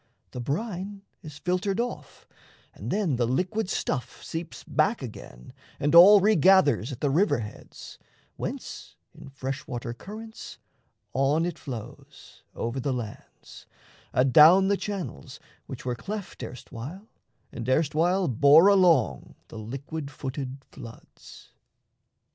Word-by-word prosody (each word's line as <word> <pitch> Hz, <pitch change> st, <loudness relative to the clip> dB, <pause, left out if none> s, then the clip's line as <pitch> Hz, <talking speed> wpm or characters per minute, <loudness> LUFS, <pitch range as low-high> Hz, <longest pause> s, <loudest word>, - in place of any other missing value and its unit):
The 125 Hz, -, -6 dB
brine 195 Hz, -, -4 dB, 0.2 s
is 155 Hz, -3 st, -10 dB
filtered 185 Hz, +3 st, -1 dB
off, 240 Hz, +1 st, -5 dB, 0.5 s
And -, -, -8 dB
then 190 Hz, -, 0 dB
the 120 Hz, -1 st, +1 dB
liquid 185 Hz, -, -1 dB
stuff 130 Hz, -3 st, -3 dB
seeps 165 Hz, 0 st, -6 dB
back 155 Hz, -, 0 dB
again 65 Hz, -, -10 dB, 0.3 s
And 145 Hz, +2 st, 0 dB
all 190 Hz, +5 st, +10 dB
regathers 190 Hz, -, +4 dB
at 125 Hz, -, -8 dB
the 145 Hz, -, +1 dB
river 185 Hz, +5 st, +3 dB
heads, 105 Hz, -2 st, -10 dB, 0.4 s
Whence -, -, -7 dB, 0.2 s
in -, -, -12 dB
fresh 135 Hz, +2 st, -6 dB
water 120 Hz, -1 st, -5 dB
currents 220 Hz, -, -10 dB, 0.6 s
on 140 Hz, +5 st, +2 dB
it 175 Hz, -2 st, -4 dB
flows 120 Hz, -6 st, -10 dB
Over 120 Hz, +3 st, -3 dB
the 135 Hz, +1 st, -1 dB
lands, 120 Hz, -4 st, -9 dB, 0.4 s
adown 155 Hz, +9 st, +6 dB
the 200 Hz, -, +3 dB
channels 185 Hz, -, -6 dB, 0.3 s
which -, -, -8 dB
Were 125 Hz, -, -1 dB
cleft 200 Hz, -, -7 dB
erstwhile 130 Hz, -, -8 dB, 0.4 s
and 120 Hz, +2 st, -6 dB
erstwhile 165 Hz, +6 st, +2 dB
bore 145 Hz, -, +6 dB
along 175 Hz, -, +3 dB
The 110 Hz, -, -9 dB
liquid 140 Hz, +7 st, -6 dB
footed 135 Hz, -1 st, -6 dB
floods. 115 Hz, -4 st, -13 dB
150 Hz, 125 wpm, -26 LUFS, 125-190 Hz, 0.6 s, all